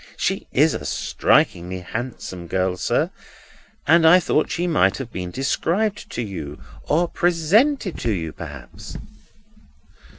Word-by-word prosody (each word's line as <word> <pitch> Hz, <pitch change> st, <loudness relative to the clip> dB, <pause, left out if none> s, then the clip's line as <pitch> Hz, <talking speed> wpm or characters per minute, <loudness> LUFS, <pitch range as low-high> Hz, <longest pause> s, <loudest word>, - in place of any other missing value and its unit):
"She -, -, -1 dB
is -, -, +4 dB
a -, -, -4 dB
strikingly 90 Hz, +2 st, +1 dB
handsome 95 Hz, -4 st, -6 dB
girl, 95 Hz, 0 st, 0 dB
sir, -, -, 0 dB, 0.7 s
and 165 Hz, +2 st, +5 dB
I 165 Hz, +3 st, +8 dB
thought 155 Hz, -3 st, +1 dB
she 175 Hz, -, -1 dB
might 95 Hz, -, +3 dB
have 130 Hz, -4 st, -6 dB
been 90 Hz, -1 st, -4 dB
described 170 Hz, -, -1 dB
to 120 Hz, -, -2 dB
you, 80 Hz, -9 st, -6 dB, 0.3 s
or 170 Hz, +4 st, +2 dB
presented 180 Hz, -, +2 dB
to 115 Hz, -, 0 dB
you 80 Hz, -6 st, -3 dB
perhaps?" 70 Hz, -7 st, -9 dB
120 Hz, 130 wpm, -22 LUFS, -, 0.7 s, I